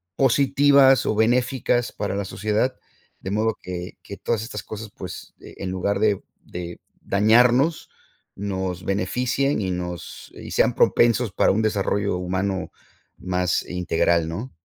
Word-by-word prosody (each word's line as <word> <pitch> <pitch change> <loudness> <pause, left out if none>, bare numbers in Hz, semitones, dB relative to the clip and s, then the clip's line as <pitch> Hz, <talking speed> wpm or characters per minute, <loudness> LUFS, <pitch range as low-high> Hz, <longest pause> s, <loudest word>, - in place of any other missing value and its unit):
positivas 135 0 +4
o - - +1
benéficas 120 +2 +1
para 100 -1 -3
la 100 0 -2
sociedad 110 +6 -1 0.5
de 95 - -5
modo 110 +1 0
que 90 0 -7
que 100 - -9
todas 115 -2 -1
estas 110 -2 -6
cosas 110 -1 -8
pues, 90 - -8
eh, - - -12
en 95 - -4
lugar 100 +2 -1
de 105 -3 +2 0.2
de 85 -1 -7 0.2
dañarnos 120 +9 +3 0.5
nos 95 -2 -4
beneficien 125 +7 0
y 95 -2 -1
nos 90 -1 -6
y - - -9
sean - - +2
propensos 120 -2 +3
para - - +3
un 105 - +1
desarrollo 100 -2 0
humano 95 +1 -2 0.5
más 90 -1 0
integral, 85 -2 +1
¿no? 105 +11 -5
100 Hz, 140 wpm, -23 LUFS, 90-120 Hz, 0.5 s, positivas